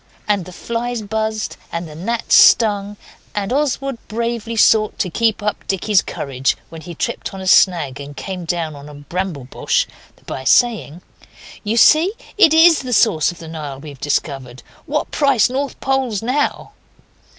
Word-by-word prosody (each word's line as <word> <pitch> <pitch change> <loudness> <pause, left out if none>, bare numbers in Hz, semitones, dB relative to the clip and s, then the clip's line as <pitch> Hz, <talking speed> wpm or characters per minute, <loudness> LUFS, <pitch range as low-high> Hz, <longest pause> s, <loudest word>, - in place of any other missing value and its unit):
And 205 -4 0
the 185 - -10
flies 235 +4 -4
buzzed, 220 +1 -3
and 170 0 -4
the 155 - -11
gnats 225 +9 -2
stung, 205 -2 +5 0.4
and 205 +3 -2
Oswald 275 -3 -1
bravely 230 0 -3
sought 215 -1 +3
to 180 - -2
keep 220 +1 0
up 210 -1 -2
Dicky's 195 +1 +2
courage, 135 -1 -2
when 165 0 -10
he 170 +2 -9
tripped 195 - -4
on - - -7
a 190 - -7
snag 170 -8 +3
and 140 0 -9
came 185 -2 -5
down 165 -3 -2
on 140 +1 -11
a 150 - -11
bramble 165 +1 -4
bush, 125 - 0 0.4
by 130 - -6
saying 185 - +2 0.6
'You 220 +2 -1
see 320 - +5 0.2
it 405 -7 +6
IS 325 0 +6
the 255 -2 -4
source 195 -8 +3
of 175 - -13
the 165 - -10
Nile 150 -4 -7
we've 140 -2 -11
discovered. 135 -4 -3 0.2
What 300 +1 -2
price 275 -5 +2
North 275 +1 -3
Poles 265 -6 -1
now? 270 +5 -1
205 Hz, 165 wpm, -18 LUFS, 160-235 Hz, 0.6 s, it